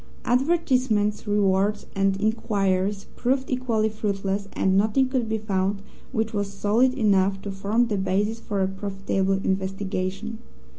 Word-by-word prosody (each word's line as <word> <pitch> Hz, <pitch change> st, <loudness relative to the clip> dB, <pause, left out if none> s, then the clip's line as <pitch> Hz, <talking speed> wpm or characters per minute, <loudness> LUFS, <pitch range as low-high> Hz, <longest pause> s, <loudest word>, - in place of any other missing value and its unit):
Advertisement, 250 Hz, -6 st, +1 dB
rewards, 205 Hz, 0 st, +2 dB
and 195 Hz, 0 st, +1 dB
inquiries 200 Hz, -3 st, 0 dB
proved 260 Hz, +2 st, 0 dB
equally 240 Hz, -4 st, +1 dB
fruitless, 200 Hz, -2 st, -2 dB
and 190 Hz, 0 st, +2 dB
nothing 220 Hz, +7 st, +3 dB
could 255 Hz, -4 st, -1 dB
be 220 Hz, -, 0 dB
found 200 Hz, -1 st, -1 dB, 0.3 s
which 225 Hz, -2 st, -1 dB
was 205 Hz, -1 st, -1 dB
solid 220 Hz, +6 st, +2 dB
enough 195 Hz, -5 st, +2 dB
to 200 Hz, -, -4 dB
form 200 Hz, +5 st, +1 dB
the 215 Hz, -3 st, -1 dB
basis 205 Hz, +4 st, 0 dB
for 205 Hz, -4 st, -1 dB
a -, -, +2 dB
profitable 195 Hz, 0 st, -1 dB
investigation. 195 Hz, +2 st, -2 dB
205 Hz, 135 wpm, -25 LUFS, 195-225 Hz, 0.3 s, nothing